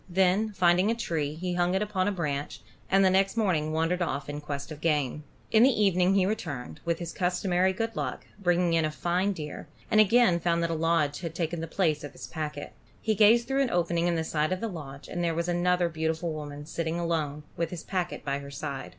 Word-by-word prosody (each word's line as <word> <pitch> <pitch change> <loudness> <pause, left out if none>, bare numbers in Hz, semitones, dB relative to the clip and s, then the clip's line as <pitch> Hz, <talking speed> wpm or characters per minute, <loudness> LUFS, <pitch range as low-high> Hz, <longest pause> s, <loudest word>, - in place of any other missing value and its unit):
Then 190 +4 +2
finding 180 +1 +3
a 230 - +2
tree, 160 -10 -2
he 180 +2 -3
hung 175 +1 +1
it 190 - +1
upon 200 -3 -1
a - - +2
branch, 150 -6 -3 0.3
and 195 0 +5
the 190 - +5
next 195 +3 +2
morning 185 -9 +2
again 155 - -3
wandered 165 +3 0
off 145 -4 -2
in 145 0 -5
quest 140 0 -5
of 150 -1 -8
game. 150 -3 0 0.3
In 220 - +5
the 255 - +7
evening 195 -5 +3
he 190 -2 +4
returned, 145 - -4
with 170 -1 0
his 170 -1 -6
customary 180 0 +1
good 225 +4 -3
luck, - - -4 0.2
bringing 175 -2 +2
in 165 -1 +3
a 155 - +1
fine 175 +5 0
deer, 155 -6 -6 0.2
and 215 - +7
again 215 -4 +4
found 170 0 +1
that 170 - 0
a - - 0
lodge 160 -3 +1
had 165 -2 -6
taken 165 -1 -2
the 165 - -4
place 160 -3 0
of 145 -1 -7
his - - -8
packet. 150 -3 -5 0.3
He 220 - 0
gazed 220 +3 +5
through 270 +1 +1
an 270 - +1
opening 170 -2 +1
in 175 - +1
the 160 - 0
side 155 +1 0
of 185 - 0
the 230 - -2
lodge, 145 -8 -8
and 175 - -3
there 165 -1 0
was 170 +1 -1
another 175 0 +2
beautiful 160 0 -2
woman 145 -1 -7
sitting 165 +1 -3
alone, 155 -3 -2
with 170 -1 -1
his 175 -1 -7
packet 180 -2 -3
by 140 0 -1
her 140 0 -9
side. 140 -1 -5
170 Hz, 235 wpm, -28 LUFS, 155-185 Hz, 0.3 s, the